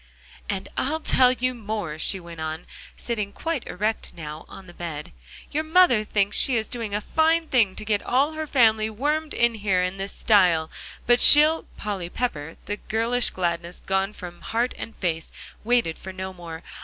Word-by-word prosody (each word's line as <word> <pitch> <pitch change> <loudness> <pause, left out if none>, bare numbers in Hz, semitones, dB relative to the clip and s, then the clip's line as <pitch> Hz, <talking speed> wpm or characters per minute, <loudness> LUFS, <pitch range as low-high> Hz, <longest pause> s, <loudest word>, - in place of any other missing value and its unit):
"And - - -3
I'll 310 +4 0
tell 255 -5 +4
you 255 0 -1
more," 210 -9 -5
she 190 - 0
went 170 -2 -10
on, 160 +1 -4 0.3
sitting 210 -4 -3
quite 325 -1 -4
erect 215 +4 -2
now 155 -1 -8
on 195 - -11
the 175 - -13
bed, 160 -4 -6 0.4
"your 310 +2 -1
mother 315 -9 +4
thinks 200 -1 0
she 260 - +3
is 220 -2 0
doing 230 -4 -4
a 210 - -1
fine 325 +6 +2
thing 230 -10 +2
to - - -6
get 210 -1 +1
all 275 +5 +1
her 315 0 -5
family 220 -5 +3
wormed 295 +7 -2
in 235 0 +3
here 200 -4 0
in 180 +1 -3
this 195 +1 -4
style, 175 -7 +3 0.3
but 240 0 +4
she'll" 305 +2 +8
Polly 195 -4 -4
Pepper, 165 -10 -4
the 205 - -3
girlish 230 +3 0
gladness 170 -1 -3
gone 195 +1 0
from 175 -4 -10
heart 235 +2 -1
and 225 - -8
face, 165 -3 -3 0.3
waited 235 -8 +1
for 190 - -8
no 190 0 -6
more. 170 -2 -9
210 Hz, 180 wpm, -24 LUFS, 180-245 Hz, 0.4 s, she'll